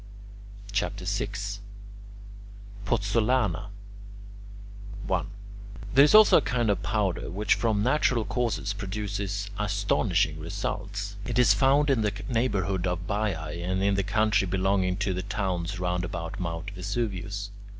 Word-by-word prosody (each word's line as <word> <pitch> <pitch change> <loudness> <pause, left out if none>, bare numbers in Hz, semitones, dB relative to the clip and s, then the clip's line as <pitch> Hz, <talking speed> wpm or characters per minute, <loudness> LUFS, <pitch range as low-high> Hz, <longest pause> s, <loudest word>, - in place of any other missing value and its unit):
CHAPTER 100 -1 -2
VI 100 +1 -1 1.6
POZZOLANA 105 0 +1 1.4
1. - - 0 0.7
There 135 +3 +8
is 150 - +5
also 215 -1 +8
a - - +3
kind 120 -4 +1
of 100 - -1
powder 105 -5 -1
which 105 +4 +1
from 110 -3 +1
natural 125 -3 +2
causes 110 -1 -1
produces 100 0 -4
astonishing 100 -5 +1
results. 100 +3 -4
It 120 +3 -3
is 120 -5 +6
found 135 +7 +3
in 125 -4 +2
the 105 -1 0
neighbourhood 100 -6 0
of 90 0 -2
Baiae 90 -6 -2
and 95 +2 -1
in 100 0 +3
the 100 - +1
country 105 0 +2
belonging 95 0 +1
to 100 -2 -1
the 90 - -2
towns 95 -3 -2
round 90 0 -1
about 85 -1 -5
Mt. 85 +2 -4
Vesuvius. 100 +1 -3
100 Hz, 130 wpm, -27 LUFS, 95-110 Hz, 1.6 s, There